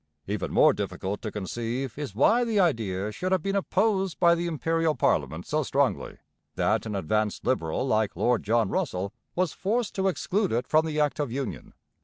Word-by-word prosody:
Even - - -3
more - - +5
difficult 100 +2 -4
to 110 - -4
conceive 115 +5 -3
is 140 -9 -6
why 225 - +4
the 225 -3 +1
idea 110 - 0
should 185 - -3
have 185 -4 +2
been 195 0 -1
opposed 195 -1 +1
by 170 -1 +6
the 170 0 -1
Imperial 165 0 0
parliament - - 0
so - - 0
strongly - - 0 0.4
that - - +1
an 105 - -3
advanced 105 +4 -1
Liberal 125 -4 0
like 110 -4 +1
Lord 120 -2 +2
John 110 -1 +1
Russell 95 +1 -2 0.2
was 180 -3 0
forced 220 +3 -1
to 195 0 0
exclude 190 +2 0
it 120 +2 -1
from 155 +1 +3
the 155 -1 -2
Act 150 0 +1
of 145 -5 -1
Union. 135 +1 -5
145 Hz, 185 wpm, -27 LUFS, -, 0.4 s, by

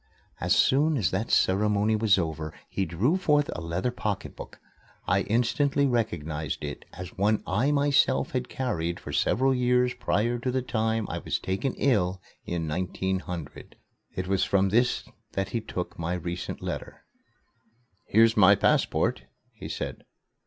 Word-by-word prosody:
As - - +2
soon 150 +3 +3
as 105 - +1
that 110 +5 -2
ceremony 105 +2 +3
was 110 -3 +3
over, 80 -3 -3
he 95 - -2
drew 105 - +1
forth 150 -5 +2
a - - -5
leather 85 +9 -2
pocketbook. 105 -5 -5 0.5
I 95 +1 +3
instantly 130 +7 +1
recognized 80 - -2
it - - -6
as 90 0 -9
one 105 +2 +2
I 115 +10 +1
myself 145 -1 +2
had 125 -1 -2
carried 85 -10 -2
for - - -8
several 135 +3 +2
years 125 0 +2
prior 120 +4 0
to 125 - -2
the 130 0 0
time 110 -2 0
I - - -4
was - - -2
taken 95 +8 -2
ill 95 -9 +1 0.3
in 85 -2 -2
1900. 90 0 -4 0.4
It 90 0 -3
was 95 -1 +1
from 100 0 +2
this 120 +5 +2 0.3
that 95 0 -2
he 115 - -2
took 90 -5 -5
my 85 +2 -1
recent 85 0 -5
letter. - - -6 1.0
"Here's 115 +1 +5
my 100 -1 +7
passport," - - +1 0.3
he - - -9
said. - - -5
105 Hz, 150 wpm, -27 LUFS, 90-125 Hz, 1.0 s, my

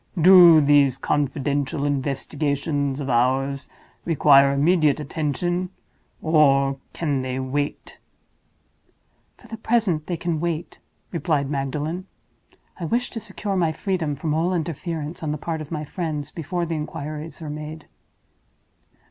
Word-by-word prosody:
Do 175 -2 +8
these 140 -2 +4
confidential 140 0 -1
investigations 140 0 -1
of 140 - -4
ours 135 +3 +1 0.3
require 140 -4 +5
immediate 150 +1 +3
attention—or 155 -3 0
can 145 -5 -1
they 130 0 -3
wait?" 145 +2 -3 1.4
"For 240 - -17
the 225 0 -7
present, 220 -9 0
they 175 - -2
can 170 -1 -2
wait," 170 0 -3 0.3
replied 150 -5 -1
Magdalen. 150 +6 -3 0.7
"I 170 - -3
wish 240 +9 -1
to 225 - -5
secure 205 -2 -4
my 170 -4 +2
freedom 165 -4 -2
from 155 +2 -2
all 170 +4 +1
interference 165 -1 -4
on 155 -2 -2
the 150 - -2
part 160 +1 -4
of 150 - -8
my 155 -2 -4
friends 150 -2 -4
before 170 +2 -3
the 165 - -3
inquiries 155 0 -6
are 155 -3 -6
made." 155 +1 -7
150 Hz, 125 wpm, -23 LUFS, 140-170 Hz, 1.4 s, Do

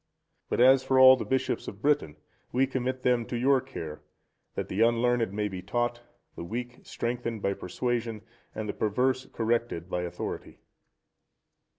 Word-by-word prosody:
(129) - - -46
But 130 +2 +6
as 135 -1 -1
for 130 0 +2
all 130 0 +10
the - - -5
bishops 130 0 -1
of 100 - -7
Britain, 145 - +2 0.4
we 130 +2 +3
commit 130 -1 -3
them 125 -2 +3
to 120 - -3
your 130 +2 +3
care, 80 - -7 0.5
that - - -3
the 100 - -2
unlearned 115 -1 +3
may 105 +1 -1
be 95 -2 -6
taught, 120 +5 -1 0.3
the - - -6
weak 120 +6 -5
strengthened 120 -2 -4
by 100 - +1
persuasion, 115 +3 -3 0.3
and 110 0 -4
the - - -2
perverse 130 +5 0
corrected 115 -6 -1
by 90 - 0
authority. 90 -1 -5
120 Hz, 165 wpm, -28 LUFS, 105-130 Hz, 0.5 s, all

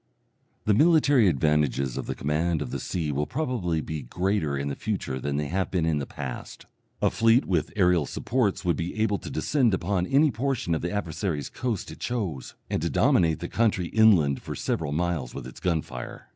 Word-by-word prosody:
The 105 - +4
military 145 - +5
advantages 70 -4 +1
of - - -4
the - - -3
command 75 +2 0
of 60 - -8
the - - -3
sea 80 -5 -2
will 75 +1 -1
probably 120 - -1
be 80 -1 -5
greater 85 +2 -1
in 70 +1 -2
the 70 - -3
future 95 -11 -3
than 70 +2 -2
they 75 - -1
have 95 +2 -1
been 90 -4 0
in 80 -2 +1
the 70 - -4
past. 65 -3 -7 0.4
A - - +4
fleet 115 +3 +4
with 85 -5 0
aerial 90 -6 +3
supports 115 -8 -1
would 85 - +2
be 90 +5 -4
able 105 -2 +1
to - - -8
descend 125 -9 +1
upon 90 0 -1
any 145 +2 +4
portion 125 -7 -1
of 80 - -1
the 85 - -2
adversary's 85 -5 -2
coast 120 -6 -3
it - - -11
chose, 95 - -3
and - - -1
to - - 0
dominate 80 -3 +3
the 85 - -3
country 100 -6 +1
inland 95 -11 +4
for - - -6
several 75 -3 -2
miles 80 -5 -2
with - - -6
its 65 - -10
gun 85 -4 0
fire. 60 -1 -8
85 Hz, 200 wpm, -26 LUFS, 75-110 Hz, 0.4 s, military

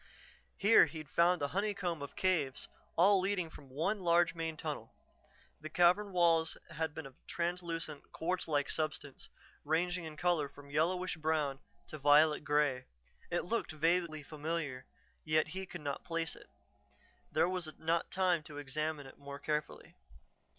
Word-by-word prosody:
Here 205 +3 +7
he'd 155 -3 -9
found 170 -1 +3
a 140 - 0
honeycomb 190 -4 -1
of 140 - -7
caves, 160 -8 0 0.3
all 195 +3 +6
leading 185 -3 -1
from 140 - -13
one 165 +11 0
large 170 -1 +3
main 165 -1 -3
tunnel. 150 -8 -5 0.6
The 155 - -7
cavern 180 +5 +4
walls 165 -3 +3
had 160 -1 -2
been 160 - -5
of 135 - -10
a - - -38
translucent, 170 -3 -3
quartz 180 +2 -1
like 145 -3 +1
substance, 155 -3 -3 0.3
ranging 170 +3 0
in 155 -1 -8
color 170 -5 +1
from 140 0 -14
yellowish 180 +4 +1
brown 155 -3 0 0.3
to 155 - -7
violet 150 +2 +5
grey. 145 -4 +2 0.4
It 175 - -1
looked 230 -3 -1
vaguely 165 0 +1
familiar, 155 -3 -4 0.4
yet 155 0 +2
he 190 +2 -5
could 175 -2 -8
not 140 -2 -3
place 165 -1 -2
it. - - -16 0.8
There 160 +2 +3
was 180 -3 -2
not 165 +1 0
time 180 -3 +2
to 150 -2 -8
examine 145 +1 -3
it 135 - -13
more 140 0 -7
carefully. 150 +1 -3
160 Hz, 155 wpm, -34 LUFS, 150-175 Hz, 0.8 s, Here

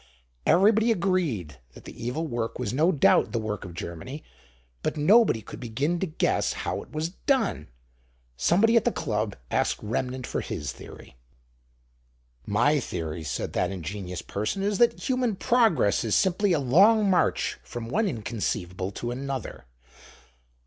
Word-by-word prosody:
Everybody 220 +5 +5
agreed 165 - -1 0.2
that - - -13
the - - -9
evil 125 +8 -2
work 120 -5 -3
was 125 -1 -3
no 160 +7 +3
doubt 145 - +3
the 115 - +1
work 105 -2 -4
of 85 -3 -9
Germany; 85 - -7 0.6
but - - -2
nobody 155 - +4
could - - -10
begin 135 +9 -1
to 190 - -1
guess 155 - 0
how - - -3
it - - -14
was 155 +2 -2
done. 225 - -1 0.7
Somebody 200 - +3
at 230 - +5
the 240 - +2
Club 105 - -2 0.2
asked - - +1
Remnant 125 +4 -2
for - - -3
his 70 -3 -4
theory. - - -13 1.3
"My 145 +9 +3
theory," 80 - -4
said 70 - -4
that 90 - 0
ingenious 90 0 -5
person, 110 - -3
"is 205 -1 0
that 240 - +3
human 250 -4 +1
progress 210 - +2
is 110 -3 +1
simply 190 +2 +2
a 165 - +3
long 200 - +5
march 185 -2 +1
from 120 -1 -7
one 205 - +1
inconceivable 100 - -3
to 120 +4 -4
another. 130 - -5
130 Hz, 150 wpm, -26 LUFS, -, 1.3 s, Everybody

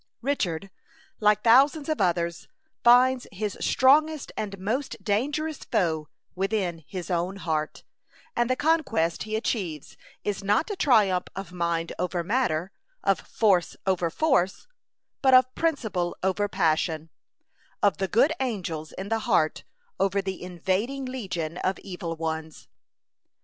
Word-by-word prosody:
Richard, 195 - -1 0.5
like 210 -1 +3
thousands 280 +6 +5
of 310 -8 -1
others, 170 -2 0 0.4
finds 250 +1 +5
his 205 0 -3
strongest 300 +3 +3
and 200 -2 -4
most 230 +9 -3
dangerous 290 +9 -1
foe 160 -8 -1 0.3
within 190 -4 -1
his 185 -1 -6
own 175 +2 0
heart; 160 -5 -3 0.5
and 240 0 +1
the 255 - +2
conquest 290 - +1
he 215 - -1
achieves 185 - -3 0.3
is 205 -1 -2
not 210 - +1
a - - -2
triumph 210 - +3
of 195 -3 -6
mind 170 -2 -1
over 180 -1 -1
matter, 185 -5 0 0.3
of - - +2
force 195 -6 +1
over 180 -3 +1
force, 195 - +1 0.6
but 265 -2 +6
of 255 0 +5
principle 220 - -1
over 190 +2 +1
passion, 160 -2 0 0.7
of 200 -3 +4
the 195 -1 -1
good 240 - +3
angels 175 -11 -3
in 190 +1 -6
the 225 0 +1
heart 155 -6 +2 0.3
over 195 0 +2
the 190 -1 -4
invading 190 +9 -2
legion 180 -10 -4
of 190 +1 0
evil 175 -3 -6
ones. 160 -1 -5
195 Hz, 135 wpm, -26 LUFS, 170-250 Hz, 0.7 s, but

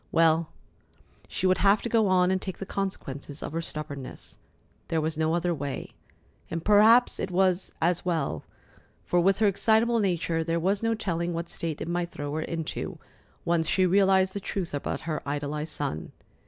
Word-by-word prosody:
Well, 165 0 +3 0.8
she - - -3
would 185 0 +3
have 200 +2 +4
to - - -1
go 225 -2 +3
on 185 -1 +3
and 190 0 0
take 190 - -5
the 195 - -6
consequences 150 -8 -4
of - - -5
her 165 +1 -2
stubbornness. 145 -4 -5 0.5
There 165 - 0
was 160 +1 -1
no 160 +1 +1
other 175 0 0
way. 145 -3 -5 0.6
And 165 0 -4
perhaps 220 +4 +6
it - - -2
was 185 0 +1
as 175 +1 +2
well, 160 - -1 0.6
for, 175 - +2
with 190 +2 +3
her 215 - +3
excitable 225 +4 +3
nature, 170 -4 0
there 165 +1 0
was 195 +4 +1
no 225 0 +1
telling 175 -5 -2
what 170 0 -4
state 160 -3 -4
it - - -3
might 175 0 -1
throw 145 -3 -5
her 160 - -1
into, 165 0 -4 0.5
once 170 -2 +1
she 185 - +3
realized 190 0 +4
the 200 - -3
truth 185 -3 -4
about 145 - -3
her 155 -2 -3
idolized 145 +2 -3
son. 110 - -4
170 Hz, 180 wpm, -27 LUFS, 160-195 Hz, 0.8 s, perhaps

